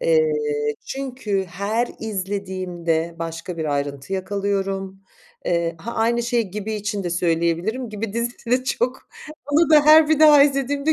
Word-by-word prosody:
eee, 475 Hz, -2 st, +3 dB, 0.5 s
çünkü 255 Hz, -8 st, -3 dB
her 200 Hz, +7 st, -1 dB
izlediğimde 185 Hz, -5 st, -3 dB
başka 165 Hz, +1 st, -5 dB
bir 160 Hz, -, -2 dB
ayrıntı 140 Hz, +1 st, -3 dB
yakalıyorum. 195 Hz, 0 st, -2 dB, 0.4 s
Eee, 170 Hz, -1 st, 0 dB
ha, 230 Hz, +8 st, -6 dB
aynı 235 Hz, +1 st, +1 dB
şeyi 235 Hz, -4 st, 0 dB
Gibi 210 Hz, +2 st, -4 dB
için 205 Hz, -1 st, -3 dB
de 175 Hz, -, -2 dB
söyleyebilirim 170 Hz, +8 st, 0 dB
Gibi 215 Hz, 0 st, -4 dB
dizisi 235 Hz, +1 st, -4 dB
de 255 Hz, +1 st, +2 dB
çok 255 Hz, -1 st, -2 dB, 0.4 s
Onu 320 Hz, +3 st, +4 dB
da 300 Hz, -2 st, +7 dB
her 310 Hz, 0 st, +8 dB
bir 315 Hz, -1 st, +2 dB
daha 300 Hz, -2 st, +8 dB
izlediğimde 280 Hz, +2 st, +1 dB
205 Hz, 145 wpm, -22 LUFS, 180-255 Hz, 0.5 s, her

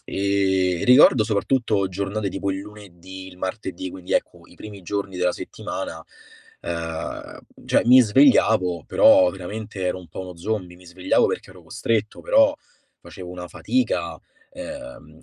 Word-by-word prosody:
e 95 Hz, -2 st, 0 dB
ricordo 125 Hz, -2 st, +6 dB
soprattutto 110 Hz, -2 st, 0 dB
giornate 100 Hz, +2 st, -3 dB
tipo 95 Hz, +1 st, -3 dB
il 95 Hz, -, -3 dB
lunedì, 95 Hz, -2 st, -11 dB
il 90 Hz, -1 st, -15 dB
martedì, 95 Hz, -1 st, -5 dB
quindi 90 Hz, 0 st, -8 dB
ecco, -, -, -1 dB
i -, -, -19 dB
primi 105 Hz, -3 st, -11 dB
giorni 100 Hz, 0 st, -4 dB
della 90 Hz, 0 st, +1 dB
settimana, -, -, -7 dB, 0.6 s
ehm, 80 Hz, -1 st, -5 dB, 0.3 s
cioè -, -, +2 dB
mi 130 Hz, +1 st, +8 dB
svegliavo, 110 Hz, -, +3 dB
però 90 Hz, -1 st, +5 dB
veramente 100 Hz, +2 st, -7 dB
ero 90 Hz, 0 st, -1 dB
un 90 Hz, -3 st, -14 dB
po' -, -, -8 dB
uno 90 Hz, -2 st, -8 dB
zombie, 90 Hz, -1 st, -4 dB
mi 90 Hz, 0 st, -18 dB
svegliavo 90 Hz, +2 st, +1 dB
perché -, -, -4 dB
ero -, -, -15 dB
costretto, 110 Hz, -2 st, -2 dB
però 280 Hz, +1 st, +4 dB, 0.5 s
facevo 90 Hz, +1 st, -11 dB
una 90 Hz, 0 st, -8 dB
fatica. 255 Hz, 0 st, -1 dB, 0.3 s
Ehm, 285 Hz, +2 st, -10 dB
95 Hz, 145 wpm, -23 LUFS, 90-110 Hz, 0.6 s, mi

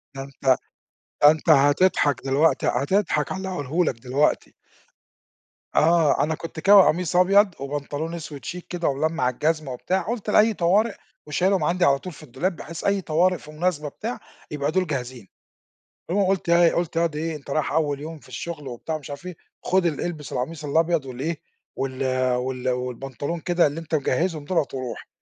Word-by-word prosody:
ده 135 Hz, -, -5 dB
أنت 140 Hz, 0 st, -16 dB, 0.8 s
ده 145 Hz, +1 st, +9 dB
أنت 160 Hz, +1 st, -3 dB
هتضحَك 145 Hz, -1 st, +4 dB
دلوقتي 140 Hz, +2 st, +2 dB
هتضحَك 150 Hz, +2 st, +1 dB
على -, -, -2 dB
اللي 190 Hz, 0 st, -4 dB
هاقوله 165 Hz, 0 st, -1 dB
لك 115 Hz, -5 st, -2 dB
دلوقتي. 135 Hz, +4 st, 0 dB, 1.2 s
آه 165 Hz, -2 st, +4 dB
أنا 160 Hz, +1 st, 0 dB
كنت 165 Hz, +1 st, -8 dB
كاوي 200 Hz, +3 st, +7 dB
قميص 175 Hz, +2 st, 0 dB
أبيض 195 Hz, +1 st, +5 dB
وبنطلون 145 Hz, +3 st, -4 dB
أسود 150 Hz, -4 st, -8 dB
chic 180 Hz, -, -5 dB
كده 175 Hz, -2 st, -2 dB
وملمّع 145 Hz, -1 st, 0 dB
الجزمة 155 Hz, +2 st, -1 dB
وبتاع، 185 Hz, +9 st, -1 dB
قُلت 220 Hz, +3 st, -4 dB
لأي 215 Hz, +1 st, +5 dB
طوارئ 200 Hz, +5 st, +2 dB, 0.3 s
وشايلهم 180 Hz, +4 st, +1 dB
عندي 175 Hz, +3 st, +2 dB
على 140 Hz, -3 st, +3 dB
طول 180 Hz, +3 st, -8 dB
في 155 Hz, -, -14 dB
الدولاب 160 Hz, +8 st, -2 dB
بحيث 165 Hz, 0 st, -8 dB
أي 200 Hz, -1 st, +1 dB
طوارئ، 175 Hz, +3 st, +2 dB
في 150 Hz, -, -13 dB
مناسبة، 155 Hz, -2 st, -1 dB
بتاع، 230 Hz, +10 st, -5 dB, 0.3 s
يبقى 145 Hz, 0 st, -1 dB
دول 185 Hz, +1 st, +1 dB
جاهزين، 125 Hz, -6 st, -5 dB, 0.8 s
المهم 195 Hz, +1 st, +2 dB
قُلت 190 Hz, -2 st, 0 dB
إيه، 170 Hz, 0 st, +5 dB
قُلت 170 Hz, -1 st, -2 dB
ياض 165 Hz, -2 st, +1 dB
إيه 160 Hz, +1 st, -2 dB
أنت 140 Hz, -1 st, -12 dB
رايح 150 Hz, 0 st, 0 dB
أول 145 Hz, -2 st, 0 dB
يوم 160 Hz, +2 st, -7 dB
في -, -, -19 dB
الشغل 160 Hz, -5 st, -6 dB
وبتاع 125 Hz, +6 st, -5 dB
ومش 150 Hz, -2 st, -10 dB
عارف 145 Hz, +5 st, -8 dB
إيه، 180 Hz, -, -7 dB, 0.3 s
خد 185 Hz, -1 st, +2 dB
ال 155 Hz, -4 st, -1 dB
إلبس 160 Hz, -4 st, -5 dB
القميص 150 Hz, +5 st, -4 dB
الأبيض 160 Hz, +1 st, +1 dB
وال 130 Hz, 0 st, -8 dB
إيه 160 Hz, +1 st, -2 dB, 0.4 s
وال 135 Hz, 0 st, -3 dB, 0.3 s
وال 125 Hz, 0 st, -3 dB
والبنطلون 125 Hz, +5 st, -3 dB
كده 175 Hz, -1 st, +2 dB
اللي 150 Hz, +3 st, -3 dB
أنت 165 Hz, -1 st, -5 dB
مجّهزهم 155 Hz, +2 st, 0 dB
دُولَة 165 Hz, -2 st, +1 dB
وروح 130 Hz, -3 st, -6 dB
155 Hz, 180 wpm, -24 LUFS, 140-175 Hz, 1.2 s, ده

